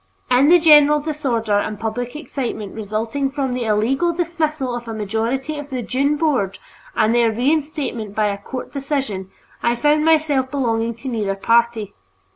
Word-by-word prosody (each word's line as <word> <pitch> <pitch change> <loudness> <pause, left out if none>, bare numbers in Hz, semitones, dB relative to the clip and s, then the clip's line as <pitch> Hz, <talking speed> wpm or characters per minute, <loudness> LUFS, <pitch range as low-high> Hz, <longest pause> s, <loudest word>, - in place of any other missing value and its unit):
In 260 +4 +5
the 350 - +8
general 300 -2 +6
disorder 250 -9 0
and 210 0 -4
public 240 +3 -3
excitement 250 -9 -5
resulting 225 +6 -2
from 270 -2 -2
the 250 -1 -2
illegal 235 +10 +1
dismissal 310 -6 -1
of 240 -1 -7
a 225 - -5
majority 230 +8 -2
of 290 0 -8
the 255 -3 -3
"Dunne" 275 +5 +1
board 260 - 0 0.4
and 220 +1 +3
their 235 -1 +3
reinstatement 260 -4 -1
by 215 - +2
a 200 0 -4
court 250 +5 -7
decision, 270 -9 -3 0.3
I 235 0 +2
found 300 +4 +2
myself 305 -5 +2
belonging 230 -4 -1
to 235 +4 -9
neither 210 -6 -1
party. 230 0 +1
250 Hz, 160 wpm, -20 LUFS, 220-290 Hz, 0.4 s, the